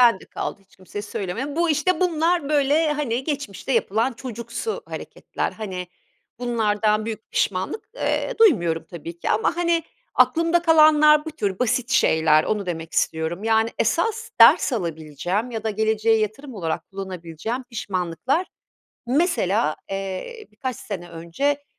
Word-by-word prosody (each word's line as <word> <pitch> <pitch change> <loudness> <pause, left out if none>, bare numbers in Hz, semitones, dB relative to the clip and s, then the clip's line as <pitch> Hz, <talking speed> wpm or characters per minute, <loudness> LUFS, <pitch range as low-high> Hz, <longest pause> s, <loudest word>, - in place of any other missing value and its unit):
Bende 235 -6 +5
kaldı - - -5
hiç 195 - -26
kimseye 195 +2 -7
söylemedim. 215 - -4
Bu 340 -1 +2
işte 365 +5 +1
bunlar 335 -3 +1
böyle 300 +1 +3
hani 265 -4 -2
geçmişte 280 - -3
yapılan 230 +2 +1
çocuksu 235 - -5
hareketler. - - -5
Hani 185 -4 -5 0.5
bunlardan 215 -3 +1
büyük 220 -1 -6
pişmanlık, 190 - -1
eee, - - -1
duymuyorum 175 - +4
tabii 170 0 -8
ki - - -2
ama 225 +10 +1
hani 340 -1 +1 0.3
aklımda 335 +1 +3
kalanlar 305 -2 +6
bu 320 - -5
tür 200 -11 -3
basit 250 0 0
şeyler. 160 -8 +4
Onu 210 -2 -1
demek 165 -2 -5
istiyorum. 160 +5 -1
Yani 225 0 +3
esas 450 0 0
ders - - +7
alabileceğim 175 - -2
ya 225 -2 -5
da 220 - +1
geleceğe 220 +1 +2
yatırım 235 +6 -3
olarak 165 -4 -3
kullanabileceğim 190 +4 -5
pişmanlıklar 205 - -1 0.6
mesela, 240 - +1
eee, 195 - -5
birkaç 250 +4 -4
sene 180 -5 -7
önce 170 - -2
225 Hz, 135 wpm, -23 LUFS, 185-290 Hz, 0.6 s, ders